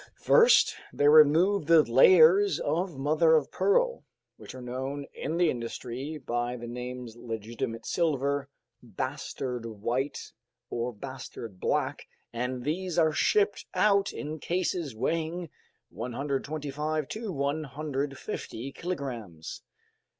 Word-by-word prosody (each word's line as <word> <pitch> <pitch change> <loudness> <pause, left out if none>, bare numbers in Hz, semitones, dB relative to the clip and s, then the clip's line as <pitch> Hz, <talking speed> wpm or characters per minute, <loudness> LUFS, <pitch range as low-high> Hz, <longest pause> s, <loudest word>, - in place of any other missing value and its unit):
First 465 -1 +5 0.2
they 145 - +2
remove 155 +5 +6
the 165 -2 +7
layers 165 +8 +6
of 165 +1 -1
mother 155 +4 +4
of 150 -3 +1
pearl, - - +2 0.3
which - - -11
are 130 - -8
known 130 +3 -4
in 160 +4 -3
the 175 -2 +3
industry 125 +5 -5
by 120 -2 -2
the 120 - -8
names 125 -1 -6
legitimate 115 0 -5
silver, 140 -4 0 0.3
bastard 125 -3 -4
white, 120 +6 -3 0.4
or 120 +1 -2
bastard 120 -4 -8
black, - - -1 0.3
and 125 +1 -3
these 175 +4 -2
are 160 -2 +4
shipped 415 - +2
out 200 -1 +3
in 155 +1 -6
cases 170 -5 -2
weighing 165 +6 -2 0.4
125 145 +4 -3
to 220 -2 -4
150 140 -3 -4
kilograms. 120 - -6
140 Hz, 110 wpm, -28 LUFS, 125-165 Hz, 0.4 s, the